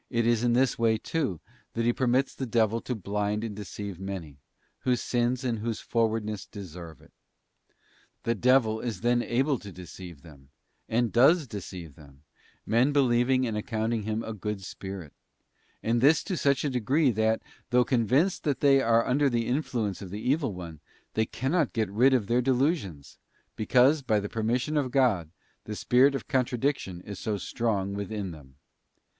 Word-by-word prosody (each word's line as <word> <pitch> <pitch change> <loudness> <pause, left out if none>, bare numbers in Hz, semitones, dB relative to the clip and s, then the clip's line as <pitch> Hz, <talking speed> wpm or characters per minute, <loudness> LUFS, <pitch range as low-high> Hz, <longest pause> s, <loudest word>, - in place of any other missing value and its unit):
is 115 -2 +2
in 120 -1 +2
this 125 0 +2
way, 115 -1 +3
too, 115 - -2 0.3
that 115 0 -1
He 120 - +3
permits 130 +2 +1
the 130 - -5
devil 115 -1 +1
to 125 - -3
blind 105 +1 -2
and 110 -3 -4
deceive 100 -2 -7
many, 90 -7 -6 0.4
whose 125 -1 +1
sins 120 +2 0
and 120 -3 -1
whose 115 0 -3
frowardness 110 -3 -1
deserve 85 -5 -10
it. - - -21 1.1
The 115 - +1
devil 120 -1 +3
is 115 -6 -4
then 120 +1 +2
able 130 +3 0
to 100 - -10
deceive 90 -3 -10
them, 70 -5 -16 0.4
and 115 0 +1
does 145 +7 +5
deceive 90 - -8
them; 70 -1 -17 0.4
men 120 +5 +3
believing 130 -2 +3
and 115 -3 -2
accounting 110 0 -1
him 110 +2 -2
a 110 - -5
good 105 -1 -4
spirit, 95 -5 -8 0.7
and 115 +1 +1
this 150 +4 +5
to 190 - -3
such 140 -2 +1
a 145 - 0
degree, 130 +4 +2
that, 110 0 +1 0.3
though 125 0 +4
convinced 130 - +2
that 145 -4 0
they 135 -1 +5
are 115 -1 +3
under 140 +2 +2
the 120 -2 0
influence 120 - -2
of 95 - -7
the 100 - -5
evil 140 - 0
one, 85 -4 -8 0.3
they 110 0 +1
cannot 145 +3 0
get 110 -3 -1
rid 130 +6 +4
of 115 -5 +1
their 120 +4 +2
delusions; 125 - -1 0.4
because, 130 +7 +4
by 110 -5 +1
the 100 - -4
permission 120 +7 -1
of 140 -3 0
God, 120 - +2 0.4
the 105 - -5
spirit 130 +6 +4
of - - -5
contradiction 125 -8 -1
is 100 0 -8
so 105 -2 -2
strong 100 -2 -1
within 100 -1 -4
them. 70 -5 -13
115 Hz, 170 wpm, -28 LUFS, 100-130 Hz, 1.1 s, does